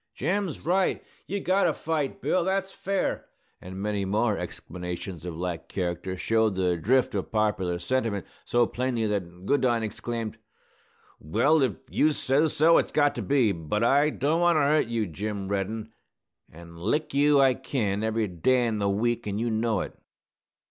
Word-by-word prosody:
"Jim's 180 +3 -1
right! 185 +3 +1 0.2
You've 200 0 -3
got 190 +2 +3
to - - +1
fight, 160 +3 -2
Bill! 185 - +2
That's 190 +1 -1
fair!" 195 0 -2 0.3
and 95 +1 -8
many 105 0 -1
more 105 +3 +1
exclamations 90 -1 -6
of 85 -2 -5
like 90 -1 -4
character, 90 0 -3
showed 110 0 +1
the 90 -2 +1
drift 125 +9 +2
of 100 -2 -3
popular 100 -5 0
sentiment 100 +1 -1 0.2
so 120 0 +2
plainly 120 -2 -1
that 90 -4 -3
Goodine 120 -3 +2
exclaimed, 115 +1 -4 0.8
"Well, 145 - +2
if 130 -6 +2 0.2
you 155 +1 +3
sez 145 +3 +1
so, 165 +3 +6
it's - - -2
got 145 -1 +3
to - - -4
be! 135 -7 +2
But 85 +5 -2
I 140 +5 +4
don't 155 +3 0
want 175 -1 +4
to 155 - +3
hurt 145 -1 +3
you, 115 -2 -1
Jim 100 +3 -4
Reddin; 105 +3 -3 0.6
an' 85 +1 -13
lick 135 - -1
you 145 +1 +4
I 135 -1 +5
kin, 110 -6 -2
every 110 0 0
day 120 +8 +2
in 110 -2 -1
the 100 -1 +1
week, 120 +3 0
an' 100 0 -2
you 115 +1 -1
know 110 -2 0
it!" - - -6
115 Hz, 170 wpm, -27 LUFS, 95-140 Hz, 0.8 s, so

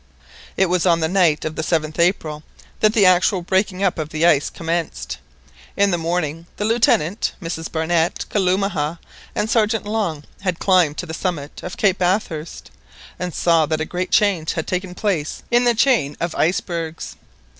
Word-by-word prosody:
It 190 - +4
was 180 0 +1
on 170 -1 +4
the 160 - +1
night 170 -4 +2
of 155 0 -3
the - - -2
7th 155 -1 -1
April 165 -4 +1 0.4
that 215 0 +3
the 210 -4 +4
actual 185 0 +4
breaking 190 +1 0
up 185 -4 +1
of 155 -1 -3
the 155 +1 0
ice 145 -4 +4
commenced. 165 0 -3 0.6
In 200 0 +3
the 175 - +1
morning 165 -1 -2
the 205 - -1
Lieutenant, 220 -5 +2
Mrs 165 -3 -5
Barnett, 165 +1 0
Kalumah, 185 -5 0 0.4
and 210 - 0
Sergeant 220 -1 +1
Long, 205 -9 -2 0.2
had 185 -4 -2
climbed 180 -6 +3
to - - -3
the 160 - -7
summit 160 -5 -4
of 180 - -7
Cape 195 -2 +2
Bathurst, 175 - -2 0.5
and 180 0 -3
saw 165 -2 +2
that 155 0 -1
a 155 - -1
great 180 +3 -3
change 195 -7 +2
had 160 - -3
taken 180 0 -3
place 180 -7 -2
in 240 +1 +4
the 240 -1 +3
chain 225 - +2
of 170 0 -2
icebergs. 165 -1 -2
175 Hz, 175 wpm, -20 LUFS, 160-195 Hz, 0.6 s, It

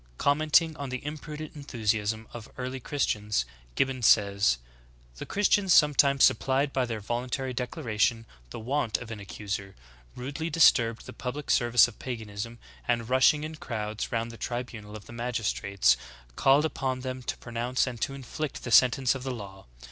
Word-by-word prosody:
4. 140 - +3
Commenting 155 +2 +3
on 140 -2 -5
the 130 +1 -5
imprudent 150 +1 -6
enthusiasm 110 -5 -1
of 115 -2 -8
the 130 - -5
ear 125 - -2
ly 130 - -5
Christians, 105 - -1 0.3
Gibbon 130 -1 0
says: 100 - +4 0.6
'*The - - -7
Christians 200 -2 +3
sometimes 140 -2 +5
supplied 135 +1 +3
by 130 -2 +1
their 115 -2 -3
voluntary 125 +4 -3
declaration 120 - -1 0.2
the - - -7
want 125 0 0
of 120 -2 -9
an 110 - -6
ac 100 +1 -9
cuser, 100 -1 -4 0.4
rudely 145 +6 -4
disturbed 115 -8 +4
the - - -9
public 135 +3 -4
service 120 0 +5
of 120 - -13
paganism, 115 -2 -6 0.3
and, 120 -1 0
rushing 130 +3 +4
in 155 +1 -5
crowds 110 -5 -4
round 115 0 -1
the 115 - -11
tribunal 115 -4 -5
of 105 - -10
the - - -11
magistrates, 105 - +1 0.4
called 140 +3 +4
upon 130 -4 -2
them 130 0 -5
to 120 - -4
pronounce 120 +2 -1
and 120 -4 -6
to 135 - -1
inflict 140 +2 -5
the 120 - -5
sentence 125 +1 +5
of 135 - -6
the 130 - -4
law. 100 - -8
125 Hz, 170 wpm, -28 LUFS, 110-135 Hz, 0.6 s, sometimes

